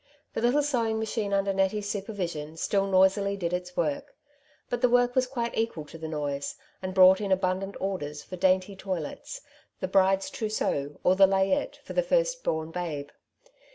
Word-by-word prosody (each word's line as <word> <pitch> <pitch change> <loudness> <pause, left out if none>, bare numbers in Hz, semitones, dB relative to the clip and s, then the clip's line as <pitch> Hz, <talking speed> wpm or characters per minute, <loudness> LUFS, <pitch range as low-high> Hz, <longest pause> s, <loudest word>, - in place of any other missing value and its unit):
The - - -2
little 250 +5 +3
sew 250 -6 +1
ing 220 0 0
machine 220 -2 -2
under 195 0 +1
Nettie^s 195 +2 +1
supervision 185 -7 -4
still 195 +3 +1
noisily 195 +1 +3
did 175 -2 -2
its 180 0 -4
work; 150 -4 -1 0.5
but 240 -1 -3
the 250 - +4
work 245 0 +3
was 255 -1 +2
quite 235 -3 -3
equal 225 -9 -2
to 155 - -11
the 160 - -5
noise, 145 -2 -3 0.3
and 185 0 -5
brought 190 +1 +7
in 200 -2 -2
abundant 190 +1 0
orders 150 -7 -3
for 185 - -8
dainty 185 +2 +2
toilets, 190 - -5 0.4
the 185 - -2
bride's 190 0 +3
trousseau 150 -10 -2
or 185 - +4
the 195 0 +7
layette 195 +9 +1
for - - -8
the - - +3
first - - +1
bom 160 0 -1
babe. 160 -5 -4
195 Hz, 180 wpm, -27 LUFS, 180-220 Hz, 0.5 s, brought